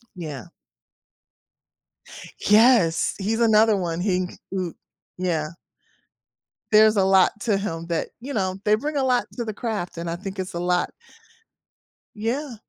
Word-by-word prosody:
Yeah. 150 -8 -7 1.9
Yes, 210 -6 +4
he's 220 +4 -1
another 220 -1 +5
one, 175 -2 -2
he 185 -2 0
c - - -12 0.2
ooh, 180 -3 -3 0.4
yeah. 165 -4 -1 1.2
There's 215 0 +6
a 195 - +4
lot 190 +2 +4
to 210 -4 +1
him 165 -4 -4
that 165 -1 -1
you 275 +4 -6
know, 190 -3 -1
they 210 0 +4
bring 295 +5 -4
a 270 - +1
lot 250 -2 +2
to 240 - -3
the 215 - -4
craft, 205 -7 -4
and 170 0 -4
I 170 - -3
think 195 +1 -7
it's 185 -1 -4
a - - -2
lot. 180 0 0 1.2
Yeah. 240 +5 -3
195 Hz, 145 wpm, -23 LUFS, 175-225 Hz, 1.9 s, There's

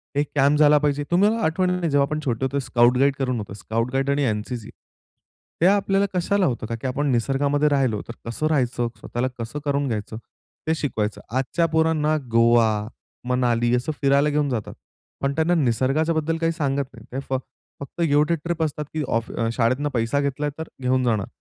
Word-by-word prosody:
एक 145 0 0
कॅम्प 145 +2 +3
झाला 150 0 +6
पाहिजे 145 -1 0
तुम्हाला 205 +6 +3
आठवण 180 +3 +1
नाही 180 -2 -1
जेव्हा 140 0 +4
आपण 155 +1 -2
छोटे 125 0 0
होतो 140 +2 -1
स्काउट, 125 0 +3
गाईड 140 +1 +3
करून 130 -3 -1
होतो, 105 -2 -7
स्काउट, 115 +4 -3
गाईड 135 +1 0
आणि 140 +1 +1
एन-सी-सी. 110 +1 -4 0.9
ते - - +5
आपल्याला 195 0 +3
कशाला 185 +2 +1
होतं 120 -5 -1
का 115 - -3
की 130 - -2
आपण 145 +3 -1
निसर्गामध्ये 140 +4 +1
राहिलो 130 -7 +1
तर 115 - -6
कसं 120 +7 -2
राहायचं, 125 -5 0
स्वतःला 120 +3 -2
कसं 115 +6 -5
करून 140 -1 0
घ्यायचं 110 -1 -4 0.5
ते 160 - +2
शिकवायचं. 110 -9 -2
आजच्या 130 +7 0
पोरांना 155 -1 +2
गोवा, 115 0 +5 0.6
मनाली 120 -1 +1
असं 125 +5 -1
फिरायला 140 +1 +3
घेऊन 150 -1 +1
जातात. 115 -5 -3 0.5
पण 140 0 0
त्यांना 160 +2 +2
निसर्गाच्या 135 +4 +1
बद्दल 160 +1 0
काही 165 0 +1
सांगत 140 -4 -1
नाही. 115 -3 -14
ते 135 - -3
फक्त 135 +4 -7
गिव्ह 150 -2 +4
टू 170 - +3
ट्रिप 170 -1 -1
असतात 150 -1 -3
की 155 -1 -1
ऑफ 115 0 -1 0.2
शाळेतून 130 +5 +1
पैसा 115 +4 0
घेतला 140 +1 -1
तर 160 - -5
घेऊन 130 0 +1
जाणार. 110 -5 0
140 Hz, 185 wpm, -23 LUFS, 120-155 Hz, 0.9 s, झाला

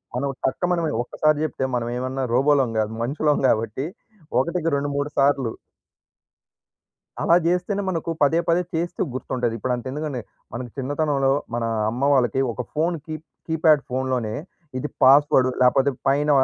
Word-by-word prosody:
మనం 140 +2 -1 0.2
టక్ 155 +6 0
మనీ 170 -3 0
ఒక్కసారి 155 +4 +1
చెప్తే 130 -2 -3
మనం 120 -1 -1
ఏమన్నా 130 +1 -2
రోబోలం 135 -1 +3
కాదు 110 0 0
మనుషులం 145 +3 +1
గాబట్టి. 115 +5 0 0.5
ఒకటికి 170 +3 0
రెండు 145 +1 -1
మూడు 145 +1 -1
సార్లు 140 -4 +3 1.7
అలా 170 - +4
జేస్తేనే 180 +3 0
మనకు 165 -2 -2
పదే 160 +4 +4
పదే 170 +2 +3
చేస్తూ 170 +2 -1
గుర్తుంటది. 125 -3 -2
ఇప్పుడు 125 +4 -1
అంతే 125 +2 -5
ఎందుకండి? 145 -3 -3 0.3
మన 115 - -4 0.2
చిన్నతనంలో 140 0 0 0.2
మన 120 -1 -1 0.3
అమ్మ 125 +4 -5
వాళ్ళకి 130 -1 +2
ఒక 125 - -4
ఫోన్ 165 +3 +1
కీప్ 155 0 -6 0.2
కీప్యాడ్ 160 -3 +3
ఫోన్‌లోనే, 130 -4 -1 0.5
ఇది 150 - -3
పాస్‌వర్డ్ 135 -1 +6
లేకపోతే 130 +2 +4 0.2
పైన 145 +2 +2
140 Hz, 140 wpm, -23 LUFS, 130-155 Hz, 1.7 s, పాస్‌వర్డ్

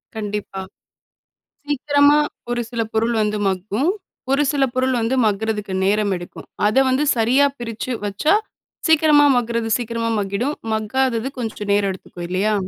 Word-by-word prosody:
கண்டிப்பா. 210 -2 -4 1.1
சீக்கிரமா 290 0 +3 0.3
ஒரு 240 0 0
சில 235 -2 -1
பொருள் 230 +2 +1
வந்து 210 0 -1
மக்கும். 205 - 0 0.4
ஒரு 275 +2 +3
சில 280 -2 +2
பொருள் 260 0 +1
வந்து 230 +3 0
மக்குறதுக்கு 210 -1 -1
நேரம் 205 +1 +2
எடுக்கும். 175 0 -10 0.2
அத 215 - +1
வந்து 260 +3 +2
சரியா 250 +5 +4
பிரிச்சு 235 +1 -4
வச்சா, 205 - +1 0.5
சீக்கிரமா 300 -2 +5
மக்குறது 235 -1 -1
சீக்கிரமா 230 -1 -2
மக்கிடும். 205 +9 -2 0.2
மக்காதது 230 +2 0
கொஞ்சம் 215 -3 -4
நேரம் 200 -1 +2
எடுத்துக்கும் 175 -2 -9
இல்லையா? 195 +4 +1
225 Hz, 135 wpm, -20 LUFS, 205-260 Hz, 1.1 s, சீக்கிரமா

